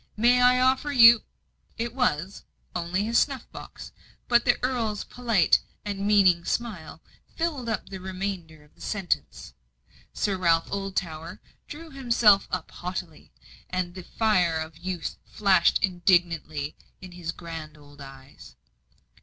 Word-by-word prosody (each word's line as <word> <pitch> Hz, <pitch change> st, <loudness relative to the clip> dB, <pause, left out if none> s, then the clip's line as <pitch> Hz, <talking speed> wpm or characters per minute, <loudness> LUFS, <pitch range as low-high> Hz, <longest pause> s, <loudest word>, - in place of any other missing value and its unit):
May 245 Hz, +3 st, +4 dB
I 250 Hz, 0 st, +5 dB
offer 260 Hz, +3 st, +2 dB
you 235 Hz, -4 st, +8 dB, 0.3 s
" -, -, -41 dB
It 235 Hz, -, -7 dB
was 195 Hz, -, -1 dB, 0.3 s
only 175 Hz, +3 st, -1 dB
his 230 Hz, +2 st, +2 dB
snuff 270 Hz, -5 st, -1 dB
box. -, -, -10 dB, 0.4 s
But 240 Hz, 0 st, +3 dB
the 245 Hz, -, +3 dB
Earl's 230 Hz, -5 st, -1 dB
polite 230 Hz, -9 st, +2 dB, 0.2 s
and 200 Hz, -1 st, -3 dB
meaning 190 Hz, -5 st, +4 dB
smile 195 Hz, -7 st, -4 dB, 0.3 s
filled 300 Hz, -8 st, -2 dB
up 220 Hz, -, -3 dB
the 190 Hz, -, -7 dB
remainder 185 Hz, -4 st, -5 dB
of 150 Hz, -, -25 dB
the -, -, -22 dB
sentence. 195 Hz, -5 st, -3 dB, 0.6 s
Sir 195 Hz, -2 st, -1 dB
Ralph 165 Hz, -2 st, +2 dB
Oldtower 185 Hz, -5 st, -4 dB, 0.3 s
drew 320 Hz, +2 st, -10 dB
himself 235 Hz, -7 st, +4 dB
up 185 Hz, -3 st, -4 dB
haughtily, 180 Hz, -3 st, -7 dB, 0.4 s
and 180 Hz, -1 st, -2 dB
the 185 Hz, -, -8 dB
fire 180 Hz, -4 st, +1 dB
of 160 Hz, 0 st, -6 dB
youth 180 Hz, +1 st, -5 dB
flashed 195 Hz, -4 st, +3 dB
indignantly 170 Hz, -5 st, +1 dB, 0.2 s
from 185 Hz, -1 st, -11 dB
his 175 Hz, -2 st, -5 dB
grand 165 Hz, -3 st, -9 dB
old 145 Hz, -1 st, -16 dB
eyes. 135 Hz, 0 st, -13 dB
190 Hz, 135 wpm, -26 LUFS, 170-230 Hz, 0.6 s, you